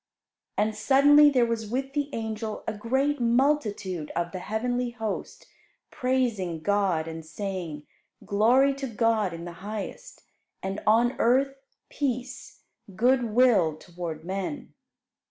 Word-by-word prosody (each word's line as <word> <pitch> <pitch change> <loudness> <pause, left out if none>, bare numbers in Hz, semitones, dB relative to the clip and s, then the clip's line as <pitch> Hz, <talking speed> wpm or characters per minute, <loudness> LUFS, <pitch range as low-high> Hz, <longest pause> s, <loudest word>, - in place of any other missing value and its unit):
And 215 +1 +1
suddenly 285 +6 +6
there 255 -4 +3
was 225 -2 -3
with 270 +3 -3
the 290 -1 -1
angel 220 -2 -4
a - - -1
great 265 +7 0
multitude 230 - +1
of 170 0 -1
the 185 - -5
heavenly 245 +5 -2
host 225 -3 -5 0.5
praising 230 -10 -1
God 195 -5 +1
and 165 0 -6
saying, 165 -3 -5 0.4
"Glory 245 +7 +4
to 275 0 -5
God 225 -4 +1
in 165 0 -7
the 175 - -6
highest, 215 - -7 0.4
and 195 +1 -3
on 235 +3 +4
earth 265 +3 +3 0.3
peace, 255 -3 -4 0.3
good 245 +4 +3
will 215 -9 +3
toward 165 -1 -7
men." 195 +9 -4
220 Hz, 125 wpm, -27 LUFS, 190-255 Hz, 0.5 s, suddenly